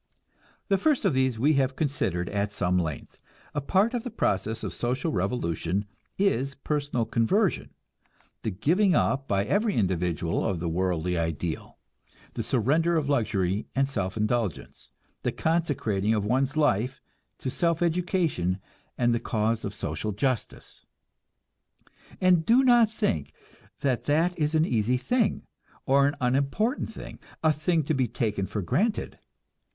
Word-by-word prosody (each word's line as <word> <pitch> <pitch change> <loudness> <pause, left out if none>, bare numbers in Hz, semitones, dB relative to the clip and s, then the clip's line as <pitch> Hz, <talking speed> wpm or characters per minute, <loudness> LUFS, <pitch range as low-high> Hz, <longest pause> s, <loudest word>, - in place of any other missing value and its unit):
The 195 -2 +2
first 290 -1 +2
of 190 - +3
these 130 -2 +1
we 145 +7 +3
have 135 0 -1
considered 95 - -1
at 100 0 -1
some 90 -2 +1
length. 80 -5 -5 0.3
A 145 - -1
part 195 - +2
of 240 -2 -2
the 250 - -4
process 110 - -1
of - - -3
social 130 +6 -1
revolution 95 -1 -1 0.3
is 140 -8 +1
personal 145 -4 -1
conversion; 180 - +1 0.7
the - - -2
giving 165 - +2
up 135 -1 +1
by 100 0 +1
every 210 - +1
individual 90 -5 0
of 90 - -1
the 85 - -3
worldly 90 0 0
ideal, 80 0 -3 0.6
the - - -3
surrender 165 +5 +2
of 145 -3 -1
luxury 105 -7 0
and 135 0 +2
self 100 -7 -3
indulgence, 105 -4 -2 0.3
the - - 0
consecrating 120 - 0
of 105 -2 -1
one's 130 +6 +1
life 130 -3 +1 0.4
to 130 - -4
self 170 +3 +1
education 170 - 0 0.4
and 120 -1 +2
the 120 - +1
cause 110 0 -1
of 100 - -3
social 100 +3 -3
justice. 125 +3 -3 1.4
And 180 -3 +4
do 240 +8 +5
not 240 -4 +5
think 80 - -2 0.5
that 130 -4 0
that 165 +5 +2
is 155 0 0
an 160 0 +4
easy 120 -2 +1
thing, 215 - 0 0.4
or 140 +1 +4
an 145 - -1
unimportant 140 - 0
thing, - - -9 0.2
a 160 -1 +4
thing 160 +2 +1
to 150 - -1
be 130 -3 +1
taken 105 -5 -2
for 105 - -3
granted. 195 - -1
130 Hz, 145 wpm, -27 LUFS, 100-160 Hz, 1.4 s, do